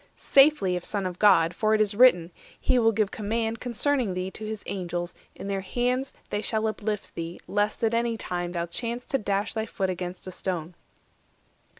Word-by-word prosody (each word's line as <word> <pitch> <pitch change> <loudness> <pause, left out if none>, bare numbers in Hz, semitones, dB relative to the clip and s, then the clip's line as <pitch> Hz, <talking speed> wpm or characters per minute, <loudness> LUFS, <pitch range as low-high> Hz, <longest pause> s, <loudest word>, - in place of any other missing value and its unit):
Safely, 270 -10 +4
if 180 - -3
Son 200 0 -2
of 180 -1 -4
God; 180 -5 +5
For 215 +4 +2
it - - +1
is 210 -2 +2
written, 200 -7 +5 0.3
'He 255 - +2
will 225 -1 +4
give 215 -2 0
command 225 +1 -2
Concerning 245 -3 0
thee 185 +1 -3
to 220 - -9
his 215 -1 -5
Angels; 175 -2 -3 0.2
in - - -7
their 195 -1 -1
hands 250 +6 -1 0.2
They 205 - -1
shall 220 0 0
uplift 215 -1 -3
thee, 165 +1 -6
lest 205 +2 0
at 225 0 +2
any 230 0 +1
time 175 -4 -3
Thou 170 -1 -1
chance 235 +7 -4
to 270 - -1
dash 200 0 -1
thy 220 0 -2
foot 190 -2 -1
against 180 0 -6
a 185 - -6
stone. 175 -2 -4
205 Hz, 195 wpm, -26 LUFS, 180-230 Hz, 0.3 s, God